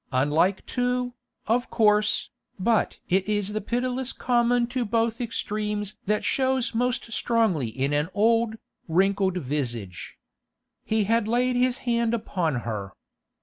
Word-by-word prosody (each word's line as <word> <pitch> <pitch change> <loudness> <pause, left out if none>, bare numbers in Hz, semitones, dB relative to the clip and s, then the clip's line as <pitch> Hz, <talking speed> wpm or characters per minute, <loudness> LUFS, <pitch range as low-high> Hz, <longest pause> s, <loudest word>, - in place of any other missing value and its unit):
Unlike 150 +9 +2
too, 250 0 -1 0.3
of 240 +3 +1
course, 215 -2 +3 0.3
but 220 +3 +1
it 190 +2 +1
is 205 -1 0
the 215 - -1
pitilessness 250 +3 -1
common 240 -1 +2
to 245 +1 -2
both 230 +1 0
extremes 210 -3 -2
that 210 +1 +1
shows 260 -2 +1
most 245 0 -1
strongly 220 - +1
in 135 +6 -2
an 150 +3 +1
old, 225 +1 +3 0.3
wrinkled 190 +2 +2
visage. 120 - -4 0.7
He 220 -1 +1
had 225 +1 +1
laid 250 +2 +1
his 250 0 +2
hand 235 -1 +1
upon 165 - -1
her. 100 -4 -4
215 Hz, 130 wpm, -25 LUFS, 185-240 Hz, 0.7 s, course